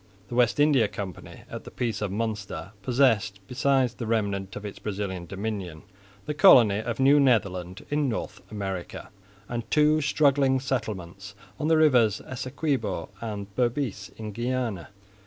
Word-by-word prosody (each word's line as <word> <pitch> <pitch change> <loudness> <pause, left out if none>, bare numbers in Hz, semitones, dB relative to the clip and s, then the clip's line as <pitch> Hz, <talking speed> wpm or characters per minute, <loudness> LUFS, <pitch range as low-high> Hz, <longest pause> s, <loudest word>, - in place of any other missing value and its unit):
The - - -7
West 120 +2 +2
India 145 -7 +4
Company 100 -4 -8
at - - -7
the - - -9
peace 115 -4 -3
of 105 - -1
Münster 100 -4 -4
possessed, 115 -5 +2
besides 130 -1 +2
the 120 -2 -6
remnant 100 -4 -1
of 105 - -7
its 100 - -7
Brazilian 95 -4 -4
dominion, 95 -5 -5 0.4
the 150 - -2
colony 125 - +7
of 115 +1 -4
New 140 +2 +6
Netherland 95 -8 +1
in 145 -2 +1
North 110 - -4
America, 95 -4 -5 0.4
and 120 -1 -3
two 155 0 +4
struggling 140 -2 +3
settlements 100 -6 -4 0.2
on 150 - -1
the 160 0 +4
rivers 125 -9 +4
Essequibo 130 - -3
and 100 -3 -5
Berbice 125 -2 -1
in 110 -1 -6
Guiana. 120 -5 -2
115 Hz, 145 wpm, -26 LUFS, 100-130 Hz, 0.4 s, colony